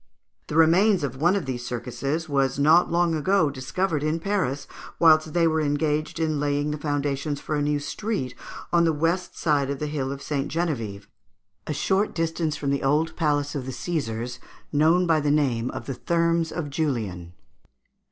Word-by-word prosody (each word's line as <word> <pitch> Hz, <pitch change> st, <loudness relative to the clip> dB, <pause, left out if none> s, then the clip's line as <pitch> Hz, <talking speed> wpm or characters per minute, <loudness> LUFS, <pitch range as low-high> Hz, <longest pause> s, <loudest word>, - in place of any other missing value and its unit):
The 150 Hz, -, -5 dB
remains 175 Hz, +4 st, +4 dB
of 135 Hz, -2 st, -3 dB
one 175 Hz, +7 st, +3 dB
of 195 Hz, -, -1 dB
these 125 Hz, -2 st, -4 dB
circuses 125 Hz, +7 st, -3 dB
was 135 Hz, -3 st, +1 dB
not 155 Hz, +5 st, +4 dB
long 170 Hz, 0 st, +2 dB
ago 160 Hz, 0 st, +2 dB
discovered 150 Hz, +5 st, -2 dB
in 155 Hz, +2 st, 0 dB
Paris 165 Hz, -8 st, -1 dB, 0.3 s
whilst 155 Hz, -2 st, +5 dB
they 170 Hz, -1 st, +3 dB
were 160 Hz, -1 st, +2 dB
engaged 150 Hz, +2 st, -1 dB
in 155 Hz, -2 st, 0 dB
laying 145 Hz, 0 st, 0 dB
the 150 Hz, -, -4 dB
foundations 145 Hz, 0 st, -2 dB
for -, -, -5 dB
a 145 Hz, -, 0 dB
new 145 Hz, 0 st, +1 dB
street, 145 Hz, -, -3 dB, 0.4 s
on 170 Hz, 0 st, +5 dB
the 165 Hz, -1 st, +3 dB
west 165 Hz, +4 st, -1 dB
side 145 Hz, -4 st, +1 dB
of 140 Hz, -, -2 dB
the 150 Hz, -, -3 dB
hill 145 Hz, -3 st, -2 dB
of 140 Hz, 0 st, -6 dB
St. 140 Hz, -1 st, -2 dB
Geneviève, 115 Hz, -, -2 dB, 0.6 s
a 150 Hz, -, -1 dB
short 195 Hz, +7 st, 0 dB
distance 165 Hz, -2 st, -1 dB
from 140 Hz, -1 st, -1 dB
the 140 Hz, -, 0 dB
old 150 Hz, +4 st, +1 dB
palace 145 Hz, -3 st, 0 dB
of 135 Hz, -3 st, -4 dB
the -, -, -3 dB
Caesars, 125 Hz, -6 st, -3 dB, 0.3 s
known 160 Hz, +5 st, +4 dB
by 165 Hz, -2 st, +3 dB
the 145 Hz, -1 st, 0 dB
name 130 Hz, -5 st, +1 dB
of -, -, -6 dB
the 135 Hz, -, -3 dB
Thermes 170 Hz, +4 st, 0 dB
of 150 Hz, -5 st, -4 dB
Julian. 110 Hz, -, -2 dB
150 Hz, 180 wpm, -25 LUFS, 140-165 Hz, 0.6 s, whilst